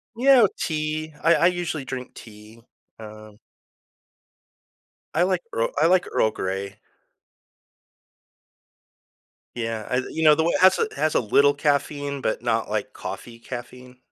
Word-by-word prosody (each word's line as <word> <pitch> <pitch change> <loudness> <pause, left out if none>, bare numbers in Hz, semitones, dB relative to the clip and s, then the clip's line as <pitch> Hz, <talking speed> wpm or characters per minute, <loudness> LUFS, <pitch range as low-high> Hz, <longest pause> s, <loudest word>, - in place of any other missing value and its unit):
You 245 - -4
know, 260 -6 +7
tea. 155 0 -3
I 165 +1 +5
I 170 - +2
usually 175 -5 -2
drink 130 -1 -7
tea, 110 +1 -14 0.4
um 110 -1 -12 1.8
I 170 - +3
like 185 -1 0
Earl 115 - 0
I 165 - +5
like 180 0 +3
Earl 110 - +2
Grey. 95 +1 -5 2.8
Yeah. 115 -2 -4
I 125 - 0
you 160 - -3
know, 150 -1 +7
the 160 - +1
one 170 - +1
it - - 0
has 185 - +6
a - - +3
it 435 - -5
has 155 - -1
a - - +5
little 140 +6 +3
caffeine, 145 -1 -1
but 110 - -2
not, 115 -2 0
like, 105 -1 -3
coffee 115 -1 -8
caffeine. 125 +1 -9
140 Hz, 150 wpm, -23 LUFS, 115-160 Hz, 2.8 s, know